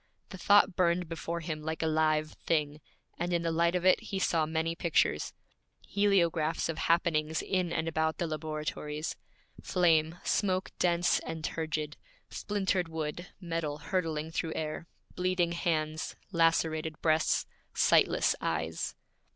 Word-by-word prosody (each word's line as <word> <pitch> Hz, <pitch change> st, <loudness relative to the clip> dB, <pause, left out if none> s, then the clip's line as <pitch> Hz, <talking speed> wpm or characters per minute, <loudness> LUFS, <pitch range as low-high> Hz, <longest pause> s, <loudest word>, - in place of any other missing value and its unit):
The 190 Hz, -, -9 dB
thought 200 Hz, -2 st, +5 dB
burned 175 Hz, -1 st, +2 dB
before 165 Hz, +1 st, -4 dB
him 155 Hz, -2 st, -4 dB
like 160 Hz, +1 st, -3 dB
a -, -, +1 dB
live 155 Hz, -1 st, +2 dB
thing; 150 Hz, -2 st, -1 dB, 0.4 s
and 175 Hz, +1 st, -1 dB
in 170 Hz, -1 st, +1 dB
the 165 Hz, -, 0 dB
light 170 Hz, +2 st, +2 dB
of 180 Hz, 0 st, -1 dB
it 185 Hz, -, +6 dB
he 195 Hz, -, -4 dB
saw 165 Hz, -4 st, +1 dB
many 160 Hz, +1 st, -1 dB
pictures 165 Hz, -, +1 dB, 0.6 s
heliographs 170 Hz, -7 st, +2 dB
of 165 Hz, -, -3 dB
happenings 160 Hz, -2 st, +1 dB
in 185 Hz, -3 st, 0 dB
and 160 Hz, 0 st, -1 dB
about 160 Hz, 0 st, 0 dB
the 175 Hz, -, -1 dB
laboratories: 155 Hz, 0 st, -4 dB, 0.5 s
flame, 165 Hz, -2 st, +2 dB
smoke 185 Hz, -2 st, 0 dB
dense 175 Hz, 0 st, +3 dB
and 160 Hz, -1 st, -6 dB
turgid, 155 Hz, -2 st, -3 dB, 0.3 s
splintered 190 Hz, -3 st, -1 dB
wood, 160 Hz, +2 st, -4 dB
metal 165 Hz, -5 st, -3 dB
hurtling 160 Hz, -1 st, -2 dB
through 165 Hz, -1 st, -2 dB
air, 155 Hz, +1 st, -4 dB, 0.3 s
bleeding 180 Hz, -1 st, +1 dB
hands, 160 Hz, -3 st, -1 dB, 0.2 s
lacerated 160 Hz, -2 st, +1 dB
breasts, 160 Hz, -1 st, +2 dB, 0.3 s
sightless -, -, +4 dB
eyes. -, -, -2 dB
165 Hz, 135 wpm, -30 LUFS, 155-175 Hz, 0.6 s, it